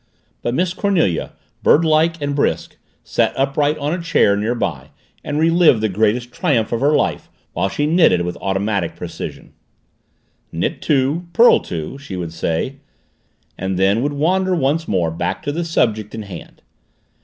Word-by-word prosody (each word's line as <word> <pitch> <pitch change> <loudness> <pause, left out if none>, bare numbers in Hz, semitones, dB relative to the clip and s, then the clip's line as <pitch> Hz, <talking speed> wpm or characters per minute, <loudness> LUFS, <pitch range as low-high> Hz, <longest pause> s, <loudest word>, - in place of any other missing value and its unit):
But 120 - -2
Miss 180 +2 0
Cornelia, 180 - 0 0.3
birdlike 160 +1 +3
and 145 -1 -2
brisk, 140 - -1 0.3
sat - - 0
upright 145 +2 +1
on 150 +1 -2
a 175 - -3
chair 165 -11 +3
near 110 +4 -1
by 70 - -3 0.3
and 145 - -3
relived 165 -5 +4
the 110 0 0
greatest 110 +5 0
triumph 130 - 0
of 115 - -1
her 145 +2 +3
life - - -1 0.2
while 95 - 0
she 145 - -1
knitted 150 - +4
with 90 0 -3
automatic 95 -2 -1
precision. - - -8 1.0
"Knit - - -2
two, 145 +5 0
purl 235 +1 +6
two," 85 - -6
she 140 -9 -8
would 85 -2 -5
say, 85 +11 -2 0.8
and 95 -1 -2
then 100 +4 +2
would 145 +2 -1
wander 185 +5 +1
once 160 +2 0
more 85 -5 0
back 85 - -3
to 145 - -2
the 170 +4 -2
subject 110 -11 0
in 110 - -5
hand. 95 -5 -11
135 Hz, 160 wpm, -19 LUFS, 100-160 Hz, 1.0 s, purl